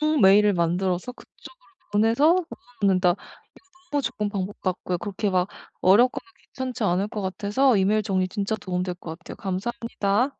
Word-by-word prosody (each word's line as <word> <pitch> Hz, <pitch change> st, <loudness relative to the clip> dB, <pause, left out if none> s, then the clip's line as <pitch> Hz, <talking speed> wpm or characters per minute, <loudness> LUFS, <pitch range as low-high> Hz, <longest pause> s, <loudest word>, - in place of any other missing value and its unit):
업무 305 Hz, 0 st, +2 dB
메일을 205 Hz, +2 st, +6 dB
만들어서 180 Hz, +5 st, 0 dB
그쪽으로 -, -, -17 dB, 0.2 s
보내서 225 Hz, +6 st, +3 dB, 0.3 s
넣어 -, -, -9 dB, 0.2 s
놓는다. 185 Hz, -2 st, +4 dB
이거 -, -, -7 dB, 0.8 s
너무 290 Hz, -1 st, +1 dB
좋은 225 Hz, -4 st, -2 dB
방법 200 Hz, -1 st, -4 dB
같고요. 180 Hz, -1 st, -2 dB
그렇게 205 Hz, +1 st, -2 dB
막 185 Hz, -1 st, +1 dB, 0.3 s
어렵거나 215 Hz, +7 st, +4 dB, 0.3 s
괜찮지 255 Hz, -3 st, -3 dB
않을 195 Hz, 0 st, +1 dB
것 210 Hz, -, -4 dB
같아서 205 Hz, +7 st, +1 dB
이메일 205 Hz, +3 st, +2 dB
정리 190 Hz, -3 st, 0 dB
진짜 205 Hz, +2 st, -2 dB
도움이 180 Hz, -2 st, -2 dB
될 180 Hz, -1 st, -4 dB
것 165 Hz, -2 st, -8 dB
같아요. 185 Hz, -, -10 dB
감사합니다. 205 Hz, +2 st, -1 dB
200 Hz, 400 characters per minute, -24 LUFS, 185-225 Hz, 0.8 s, 메일을